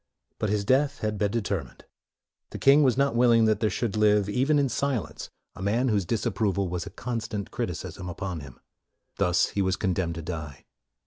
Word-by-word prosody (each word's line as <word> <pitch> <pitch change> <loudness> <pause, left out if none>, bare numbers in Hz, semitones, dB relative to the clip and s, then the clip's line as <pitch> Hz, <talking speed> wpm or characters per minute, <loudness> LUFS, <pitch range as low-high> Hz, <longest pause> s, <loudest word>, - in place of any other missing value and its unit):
But 110 - 0
his 105 -1 0
death 140 +4 +2
had 105 -1 -2
been 105 - +2
determined. 110 -1 -3 0.6
The - - -7
king 140 +2 +6
was 130 -4 +3
not 140 -3 +2
willing 115 -2 +5
that 110 -1 +2
there 110 - +1
should 110 +1 -2
live, 105 -1 +3
even 130 +8 +2
in 140 -1 +3
silence, 130 -2 -2 0.2
a - - -11
man 115 +6 +1
whose 100 -4 +1
disapproval 100 -2 0
was 90 -1 -4
a - - -5
constant 115 -5 -4
criticism 90 - -4
upon 90 -1 -4
him. 70 -4 -12 0.6
Thus 90 0 +2
he 100 - -1
was 95 -1 +1
condemned 90 -4 -1
to 85 - -6
die. 75 -5 -6
105 Hz, 185 wpm, -26 LUFS, 95-120 Hz, 0.6 s, king